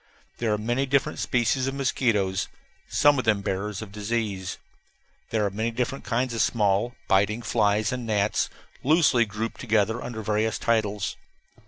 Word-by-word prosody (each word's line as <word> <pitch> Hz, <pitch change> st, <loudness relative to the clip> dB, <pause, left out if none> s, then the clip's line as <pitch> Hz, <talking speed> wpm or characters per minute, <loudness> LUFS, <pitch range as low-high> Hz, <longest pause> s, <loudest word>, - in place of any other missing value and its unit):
There 115 Hz, -2 st, 0 dB
are 105 Hz, -, +2 dB
many 120 Hz, +6 st, -1 dB
different 140 Hz, 0 st, +1 dB
species 125 Hz, +2 st, +1 dB
of 135 Hz, -, -2 dB
mosquitoes, 105 Hz, -8 st, +1 dB, 0.4 s
some 145 Hz, -2 st, +4 dB
of 125 Hz, -, -2 dB
them 105 Hz, -3 st, +3 dB
bearers 100 Hz, +1 st, -3 dB
of 100 Hz, -, -11 dB
disease. 105 Hz, -3 st, -2 dB, 0.7 s
There 110 Hz, -2 st, +1 dB
are 100 Hz, -, -1 dB
many 110 Hz, +4 st, -1 dB
different 125 Hz, +3 st, -3 dB
kinds 125 Hz, +1 st, 0 dB
of 115 Hz, -, 0 dB
small, 105 Hz, +2 st, +1 dB
biting 100 Hz, +4 st, +2 dB
flies 110 Hz, -1 st, +2 dB
and 125 Hz, -2 st, -4 dB
gnats, 105 Hz, -1 st, +1 dB, 0.3 s
loosely 145 Hz, -5 st, +4 dB
grouped 110 Hz, +2 st, -4 dB
together 110 Hz, 0 st, +1 dB
under 110 Hz, -3 st, -5 dB
various 110 Hz, +1 st, 0 dB
titles. 105 Hz, -3 st, 0 dB
110 Hz, 155 wpm, -26 LUFS, 105-120 Hz, 0.7 s, some